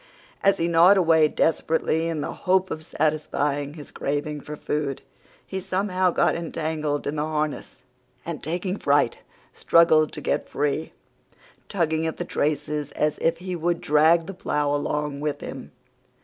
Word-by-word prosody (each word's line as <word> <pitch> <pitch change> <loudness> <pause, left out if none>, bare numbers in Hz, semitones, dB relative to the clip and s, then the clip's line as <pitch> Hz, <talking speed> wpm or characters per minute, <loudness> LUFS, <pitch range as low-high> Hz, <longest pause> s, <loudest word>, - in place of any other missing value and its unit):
As 195 0 +4
he 165 - 0
gnawed 170 +4 +6
away 160 -4 +5
desperately 160 +1 +1
in 160 -3 -2
the - - -4
hope 185 0 +1
of 155 - -4
satisfying 150 -2 -1
his 150 -3 -10
craving 145 +1 -3
for 150 - -7
food, 150 -2 -3 0.4
he 190 - -4
somehow 185 0 0
got - - +2
entangled 155 -3 -3
in 150 +2 -2
the - - 0
harness, 155 -1 -3 0.4
and, 165 -2 -5
taking 180 +5 -3
fright, 145 -7 +2 0.3
struggled 160 -2 +4
to - - -6
get - - -1
free, 145 +2 -1 0.8
tugging 160 -4 0
at 160 - -4
the - - -3
traces 150 0 -2
as 150 0 0
if 165 0 +1
he 180 +1 -5
would 170 0 0
drag 160 +3 +4
the 195 - -7
plough 150 -5 -1
along 145 0 -2
with 145 -1 -2
him. 135 - -8
155 Hz, 155 wpm, -24 LUFS, 150-170 Hz, 0.8 s, gnawed